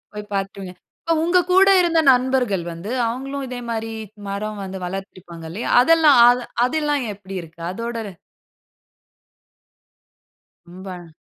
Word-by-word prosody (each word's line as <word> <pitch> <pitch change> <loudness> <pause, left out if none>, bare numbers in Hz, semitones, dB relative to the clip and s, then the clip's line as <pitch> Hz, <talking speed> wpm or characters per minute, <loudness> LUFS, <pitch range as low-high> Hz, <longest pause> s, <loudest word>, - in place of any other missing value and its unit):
போய் 210 0 -8
பார்த்துடுங்க. 195 -1 -4 0.3
இப்ப 330 - 0
உங்க 345 +2 +3
கூட 385 +2 +6
இருந்த 335 -2 +2
நண்பர்கள் 250 -7 +1
வந்து, 170 +5 -8 0.2
அவுங்களும் 270 +4 -4
இதே 250 -1 -6
மாரி 225 -1 -3 0.4
மரம் 205 +1 -4
வந்து 190 0 -6
வளர்த்து 190 +2 -6
இருப்பாங்க 170 -2 -11
இல்லையா? 205 +7 -4
அதெல்லாம் 315 0 +5
அது 245 0 +2 0.2
அதெல்லாம் 295 0 0
எப்டி 195 -1 -10
இருக்கு? 165 0 -14
அதோட 230 +4 -5 2.7
ரொம்ப. 180 -2 -10
220 Hz, 125 wpm, -21 LUFS, 190-270 Hz, 2.7 s, கூட